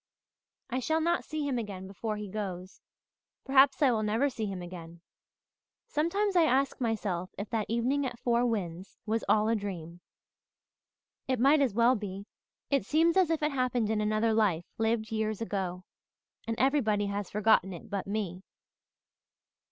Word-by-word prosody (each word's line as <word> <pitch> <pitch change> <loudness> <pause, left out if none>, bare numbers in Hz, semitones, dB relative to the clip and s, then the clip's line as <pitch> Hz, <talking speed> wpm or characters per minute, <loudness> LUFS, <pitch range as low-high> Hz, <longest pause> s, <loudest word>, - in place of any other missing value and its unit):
I 255 - 0
shall 315 +5 +1
not 340 +2 +1
see 310 -2 -3
him 255 -3 0
again 195 -4 -6
before 210 +3 -4
he 210 0 -5
goes 185 -2 -6 0.6
perhaps 270 +2 +5
I 265 - +5
will 220 -2 +1
never 225 +7 +1
see 220 -4 -3
him 195 -2 -4
again. 170 -1 -9 0.8
Sometimes 380 +7 0
I 340 -2 +6
ask 270 -1 +1
myself 200 -6 -2
if 200 +1 -6
that 220 -3 -1
evening 255 +5 +1
at 240 -1 -7
Four 235 0 +1
Winds 185 -5 -4
was 225 +1 -1
all 215 0 +4
a 230 - +2
dream. 175 -5 -6 1.3
It 260 -2 0
might 280 +4 +5
as 250 -7 +1
well 235 +2 +5
be 200 -3 -5 0.5
it 275 -1 +2
seems 330 +2 +3
as 375 -4 +4
if 320 -2 0
it 300 - +2
happened 250 -4 0
in 215 -1 0
another 215 +1 +1
life 195 -7 +2
lived 220 0 0
years 220 -1 -1
ago 190 -5 -3 0.6
and 225 0 -2
everybody 235 -7 +2
has 200 -1 -3
forgotten 210 -2 +3
it 185 +6 -9
but 200 -2 -4
me. 195 -3 -3
220 Hz, 165 wpm, -30 LUFS, 200-260 Hz, 1.3 s, I